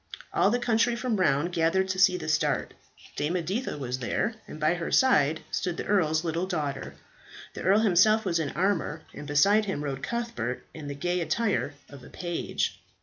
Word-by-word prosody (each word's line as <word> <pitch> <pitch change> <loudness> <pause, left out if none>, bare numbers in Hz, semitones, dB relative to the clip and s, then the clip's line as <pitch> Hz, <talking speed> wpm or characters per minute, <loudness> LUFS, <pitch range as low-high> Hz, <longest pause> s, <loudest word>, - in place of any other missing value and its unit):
All - - +4
the 240 - +2
country 240 0 +2
from 235 -4 -1
around 165 -1 +2
gathered 175 +3 +2
to 185 0 -1
see 185 -1 +5
the - - -6
start. 150 -1 0 0.4
Dame 150 +4 -1
Editha 185 +5 -2
was 130 -2 -3
there, 130 - -1
and 155 - -9
by 155 +2 +3
her 175 -1 -4
side 160 - +4
stood 175 -2 -2
the - - -4
earl's 160 -6 +2
little 170 +2 -1
daughter. 145 -7 -3 0.6
The - - -7
earl 200 +4 +4
himself 215 +2 +4
was 170 -3 +1
in 150 -3 -1
armour, 175 -3 -1
and 145 - -8
beside 200 +9 +4
him 190 -7 -3
rode 135 -2 -4
Cuthbert 235 - -3
in 155 -3 -8
the 140 - -5
gay 175 +5 -1
attire 200 -5 0
of 140 -3 -13
a - - -12
page. 175 -2 -3
175 Hz, 190 wpm, -27 LUFS, 150-205 Hz, 0.6 s, see